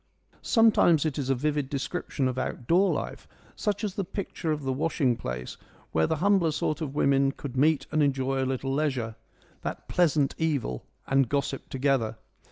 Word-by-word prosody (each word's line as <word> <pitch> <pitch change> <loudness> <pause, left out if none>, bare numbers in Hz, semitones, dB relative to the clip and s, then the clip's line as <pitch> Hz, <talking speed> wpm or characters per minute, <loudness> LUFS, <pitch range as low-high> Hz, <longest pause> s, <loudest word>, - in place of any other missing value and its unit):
Sometimes 210 - +4
it 150 -2 -1
is 135 -2 -2
a 135 - +3
vivid 145 +1 -1
description 140 -1 -2
of 130 0 -2
outdoor 170 +10 +1
life, - - -4 0.3
such 205 -1 -2
as 205 -3 -1
the 200 -1 -2
picture 175 -3 -4
of 150 -1 -2
the 135 -1 0
washing 140 -3 +1
place, 60 - -5 0.3
where 80 0 +2
the - - +1
humbler 190 0 +3
sort 150 +1 -1
of 145 -3 -4
women 140 -1 +3
could 135 -2 -8
meet 150 +3 +3
and 155 0 +2
enjoy 135 -1 +1
a 130 - -1
little 135 0 -2
leisure, 130 -7 -1 0.2
' - - -31
that - - -5
pleasant 155 -5 +2
evil,' 140 - -1 0.2
and 135 -3 +2
gossip 140 -1 -2
together. 130 -5 0
140 Hz, 175 wpm, -27 LUFS, 130-160 Hz, 0.3 s, Sometimes